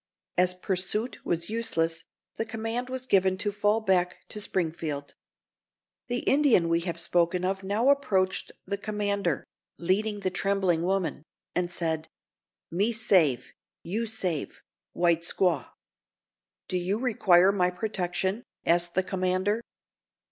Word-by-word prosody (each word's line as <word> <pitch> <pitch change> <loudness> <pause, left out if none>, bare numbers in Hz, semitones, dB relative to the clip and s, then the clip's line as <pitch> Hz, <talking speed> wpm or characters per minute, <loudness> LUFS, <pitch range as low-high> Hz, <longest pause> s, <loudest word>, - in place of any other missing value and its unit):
As 180 0 +3
pursuit 195 +5 -1
was 170 0 -1
useless, 165 -8 0 0.3
the - - -1
command 225 +2 -3
was 255 0 -4
given 190 -4 +3
to 205 +1 -1
fall 205 +2 +1
back 185 -4 +1
to 210 - -5
Springfield. 160 -6 -2 0.9
The 245 0 -1
Indian 270 - +4
we 165 0 +3
have 170 -1 -3
spoken 175 +1 +1
of 195 +1 -1
now 205 +7 +1
approached 195 -10 +1
the 200 +1 -3
commander, 200 -5 -1 0.3
leading 205 +4 0
the 185 - -1
trembling 190 -3 +1
woman, 185 -3 -1 0.3
and 180 -1 0
said: 160 -2 -2 0.6
"Me 200 +7 +1
save—you 185 - +1
save—white 175 -3 -2
squaw!" 170 -5 0 1.0
"Do 180 - -1
you 185 +4 -1
require 195 -6 +4
my 180 -3 +2
protection?" 190 +1 -2 0.2
asked 175 0 +2
the 190 - +3
commander. 185 +3 0
185 Hz, 120 wpm, -28 LUFS, 175-210 Hz, 1.0 s, Indian